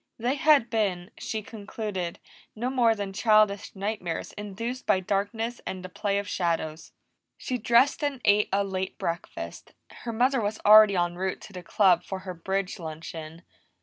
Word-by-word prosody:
They 240 +3 0
had 285 -5 +4
been, 195 -4 -1
she 220 -1 -4
concluded, 205 -4 -5 0.4
no 240 +4 -2
more 235 -4 +3
than 200 -2 -5
childish 215 -1 +3
nightmares 195 -4 -3
induced 230 +5 -5
by 190 - +4
darkness 205 +5 -2
and 185 -1 -5
the - - -7
play 200 +1 -1
of 200 0 -2
shadows. 165 -3 -2 0.5
She 250 -1 -3
dressed 240 +7 +3
and 285 -3 -1
ate 205 +1 +4
a 200 +1 +2
late 190 -1 -4
breakfast; 170 +1 -5 0.2
her 235 - -7
mother 250 +3 +2
was 210 +1 -2
already 215 -1 +8
en 175 -1 0
route 190 +1 -2
to 200 - -12
the 180 - -7
Club 180 0 +3
for 190 - -5
her 185 - -4
bridge 190 +3 -3
luncheon. 160 0 -8
200 Hz, 165 wpm, -27 LUFS, 185-225 Hz, 0.5 s, already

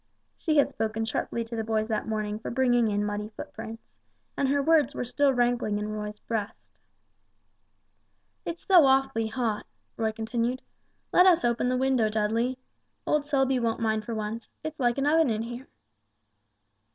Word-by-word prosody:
She 310 -2 0
had 285 - +5
spoken 220 0 -2
sharply 230 +1 -2
to 230 +1 -7
the 225 - -2
boys 220 -1 0
that 215 -1 -1
morning 215 -1 -2
for - - -6
bringing 245 -2 +2
in 205 0 0
muddy 210 0 -3
footprints, 225 +1 -8 0.5
and 275 - +1
her 285 +1 +2
words 310 +1 +3
were - - -2
still 280 +3 +2
rankling 240 -4 +1
in 210 0 -3
Roy's 210 0 -5
breast. 220 -1 -4 1.9
"It's 335 0 -6
so 350 -7 +7
awfully 265 -4 +2
hot," 220 -2 -2 0.3
Roy 220 -1 0
continued; 235 +3 -2 0.5
"let 360 +1 +7
us 340 -8 +5
open 240 +1 +1
the 255 - +1
window, 255 -4 +2
Dudley. 225 +4 0 0.5
Old 295 -1 +1
Selby 270 -2 +2
won't 230 -2 -1
mind 220 -1 0
for 230 0 -4
once; 215 +1 -4
it's 315 0 -6
like 240 -1 +2
an 275 - 0
oven 315 -1 +4
in 220 0 -1
here." 240 +3 -7
235 Hz, 165 wpm, -27 LUFS, 220-265 Hz, 1.9 s, so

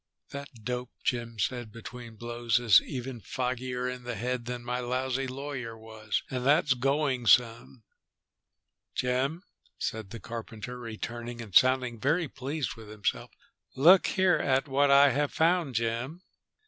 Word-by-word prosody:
"That 140 0 -6
dope," 125 +1 -3
Jim 115 -2 -2
said 120 +2 -2
between 115 +1 -9
blows, 120 0 0
"is 115 -6 +7
even 125 -2 -6
foggier 125 0 -2
in 125 0 -4
the 120 -1 -5
head 120 +3 -2
than 120 0 -5
my 125 +1 -1
lousy 130 +2 -1
lawyer 130 -3 -5
was, 110 -1 -4
and 125 -1 -2
that's 140 0 +4
going 135 -1 0
some." 115 +1 +3 1.1
"Jim," 130 +7 0 0.3
said 110 -3 -4
the 115 +3 -8
carpenter, 115 +1 -7
returning 120 +1 -6
and 110 -5 -8
sounding 125 0 +4
very 160 +7 +1
pleased 135 +1 -4
with 110 -2 -12
himself, 105 - -2 0.5
"look 175 +8 +7
here 185 -2 +3
at 135 +2 +1
what 140 +1 +3
I 140 0 +7
have 145 +3 0
found, 165 -5 +2
Jim." 120 +9 -2
125 Hz, 145 wpm, -29 LUFS, 115-135 Hz, 1.1 s, is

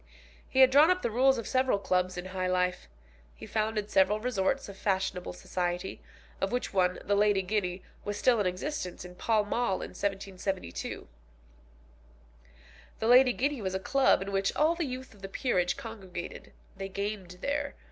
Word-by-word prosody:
He 265 - +3
had 260 0 +8
drawn 295 +5 +7
up 365 0 +2
the 235 - 0
rules 265 +3 +4
of 230 - -4
several 255 -4 +2
clubs 185 -2 0
in 180 - -4
high 185 0 -2
life. 180 - 0 0.5
He - - -10
founded 215 -1 -1
several 200 +2 +4
resorts 250 +2 0
of 200 - -9
fashionable 190 -2 -1
society, 180 +1 -3 0.4
of 195 - 0
which 245 -3 -2
one, 180 -1 +2
the 205 - 0
Lady 205 -1 +3
Guinea, 185 -2 -1 0.2
was 205 0 -3
still 240 0 +3
in 200 - +2
existence 185 - -4
in 180 - -10
Pall 215 +3 +1
Mall 210 -2 0
in - - -6
1772. 195 - -4 1.9
The 220 - -1
Lady 250 +1 +7
Guinea 275 +1 -1
was 190 -1 -2
a - - 0
club 265 -1 +3
in 200 - -6
which 195 0 +1
all 310 +2 +4
the 340 -1 -2
youth 260 0 -7
of 205 - -19
the 195 - -6
peerage 180 -6 0
congregated. 190 -6 -8 0.2
They 195 0 -5
gamed 200 -2 -4
there. 285 0 -1
200 Hz, 175 wpm, -30 LUFS, 185-245 Hz, 1.9 s, had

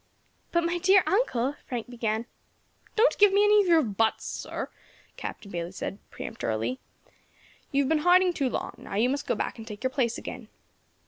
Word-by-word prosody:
"But, 340 0 +2
my 340 +1 0
dear 375 +2 +5
uncle," 290 - +1
Frank 240 -3 -4
began. 230 -2 -2 0.7
"Don't 455 +3 +4
give 410 -1 +7
me 405 +1 +5
any 420 0 +6
of 390 - -1
your 330 -3 +5
buts, 220 0 0
sir," - - -5 0.4
Captain 200 - -7
Bayley 170 0 -4
said 195 +1 -5
peremptorily. 115 - -3 0.9
"You 280 -1 +3
have 265 - -2
been 320 - +3
hiding 360 +2 +5
too 275 -5 0
long, - - -3
now - - -7
you 230 +5 +3
must 285 +1 -3
go - - +1
back - - -3
and 225 - -9
take 210 0 -8
your 260 - +1
place 240 -3 0
again." - - -7
260 Hz, 185 wpm, -27 LUFS, 220-355 Hz, 0.9 s, give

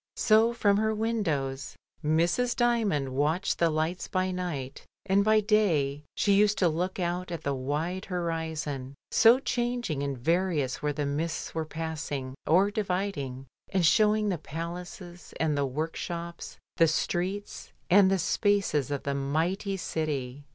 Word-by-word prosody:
So 220 +1 +4
from 205 -4 +2
her 220 +1 +1
windows 160 -12 -2 0.3
Mrs. 170 +11 +2
Dymond 220 - +1
watched 150 +8 0
the 170 - +4
lights 160 +3 -1
by 185 0 0
night, 170 -8 -4 0.2
and 195 +1 +3
by 215 +1 +4
day 170 -10 +2
she 200 - +2
used 205 0 +4
to 180 -3 +3
look 180 +4 -2
out 180 +1 -2
at 170 - -5
the 140 - 0
wide 150 +8 -2
horizon, 160 -6 -3 0.2
so 230 +2 +7
changing 240 - -2
and 140 -2 -2
various 160 -1 0
where 150 - 0
the 145 0 -2
mists 155 +3 -3
were 160 -1 -2
passing 155 -5 -4
or 190 +5 +4
dividing, 180 -11 -2 0.2
and 185 -3 +1
showing 210 +4 +4
the 180 -5 -1
palaces 175 +2 -8
and 155 -2 +1
the 140 -1 +1
work 155 +5 -3
shops, 170 0 -6 0.2
the 165 - +6
streets, 180 +5 -2 0.2
and 190 +1 +6
the 195 - +2
spaces 185 - +1
of 145 -1 -3
the 140 - -1
mighty 165 +8 -1
city. 145 -6 -3
170 Hz, 150 wpm, -28 LUFS, 145-200 Hz, 0.3 s, so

